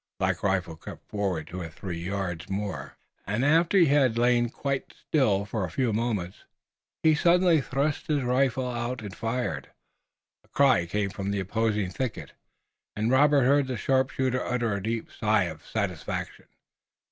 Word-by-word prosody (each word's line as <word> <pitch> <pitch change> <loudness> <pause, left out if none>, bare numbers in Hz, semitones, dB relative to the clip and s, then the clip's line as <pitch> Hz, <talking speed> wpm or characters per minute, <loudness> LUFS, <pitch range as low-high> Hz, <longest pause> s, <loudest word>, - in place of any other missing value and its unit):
Black - - 0
Rifle 90 -5 0
crept - - -11
forward 95 -7 -2
two 90 +4 -7
or 85 - -5
three 85 +1 -6
yards 90 -1 -4
more, 95 -9 -4 0.3
and, 105 +6 0
after 165 +6 +4
he 175 - +7
had 135 -5 +3
lain 120 0 +3
quite 140 +2 -3
still 105 -10 +1
for 105 -1 -3
a 90 - -3
few 120 +5 0
moments, 105 -5 -2 0.6
he 160 -1 +6
suddenly 170 0 +4
thrust 140 +3 -1
out 155 - +3
his 140 - 0
rifle 130 +1 +1
and 120 -4 -4
fired. 120 +2 -3 0.7
A - - -28
cry 135 -11 +3
came 100 +2 -1
from 100 +1 -4
the 100 0 -1
opposing 105 0 0
thicket 125 +3 -4 0.6
and 110 +3 0
Robert 145 +1 +5
heard 140 +1 +3
the 130 -2 -3
sharpshooter 130 +1 +1
utter 120 -3 -1
a 100 - -2
deep 115 +2 -3
sigh 110 -2 +2
of 80 -2 -6
satisfaction. 100 -7 -3
115 Hz, 160 wpm, -27 LUFS, 95-130 Hz, 0.7 s, he